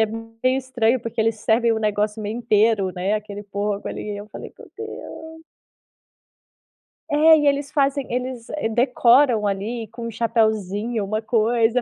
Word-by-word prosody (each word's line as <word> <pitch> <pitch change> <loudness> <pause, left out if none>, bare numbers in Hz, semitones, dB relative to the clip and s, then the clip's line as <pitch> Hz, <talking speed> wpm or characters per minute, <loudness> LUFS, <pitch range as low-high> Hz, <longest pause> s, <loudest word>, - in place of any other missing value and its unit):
é 220 - +4
meio 225 +3 -2
estranho, 255 -2 0
porque 230 0 -4
eles 225 0 +2
servem 230 +2 +2
o 220 - 0
negócio 210 0 -1
meio 210 +2 -4
inteiro, 215 -4 +2
né, 185 +3 -1
aquele 205 -1 -5
porco, 205 0 -3
ali, 210 - -5
e - - -5
eu 205 +1 -8
falei: - - -9
“Meu - - -13
Deus”. 320 -7 -9 1.7
É, 315 +2 +6
e 295 - +1
eles 285 0 0
fazem 280 -2 +1
eles, 250 -1 -4 0.3
decoram 245 -2 +4
ali, 215 +4 -3
com 230 +1 -7
um - - -5
chapeuzinho, 220 -1 0
uma 215 +2 -2
coisa. 230 +1 +2
225 Hz, 155 wpm, -22 LUFS, 210-250 Hz, 1.7 s, É